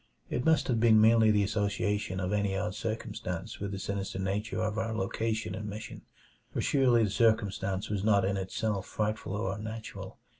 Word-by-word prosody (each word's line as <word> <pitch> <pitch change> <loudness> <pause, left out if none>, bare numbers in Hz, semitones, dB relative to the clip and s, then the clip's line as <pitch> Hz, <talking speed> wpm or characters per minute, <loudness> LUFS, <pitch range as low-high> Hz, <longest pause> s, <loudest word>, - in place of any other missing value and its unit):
It 125 - 0
must 160 -1 +3
have 120 -3 +1
been 110 -1 +6
merely 110 0 +6
the 105 -1 +4
association 100 -1 -1
of 95 +1 -1
any 100 -2 +1
odd 105 +1 -2
circumstance 110 -3 -4
with 100 -1 -3
the 100 - -4
sinister 100 0 -3
nature 100 +3 -2
of 110 0 -1
our 110 0 -2
location 110 +2 -1
and 105 -1 -5
mission, 110 +3 -7 0.5
for - - -3
surely 125 -5 +3
the 105 - 0
circumstance 100 -4 +1
was 100 -2 -2
not 100 -3 +4
in 100 +1 0
itself 95 +1 -2
frightful 105 -1 -2
or 95 -2 -1
unnatural. 110 +1 -7
105 Hz, 180 wpm, -30 LUFS, 100-110 Hz, 0.5 s, been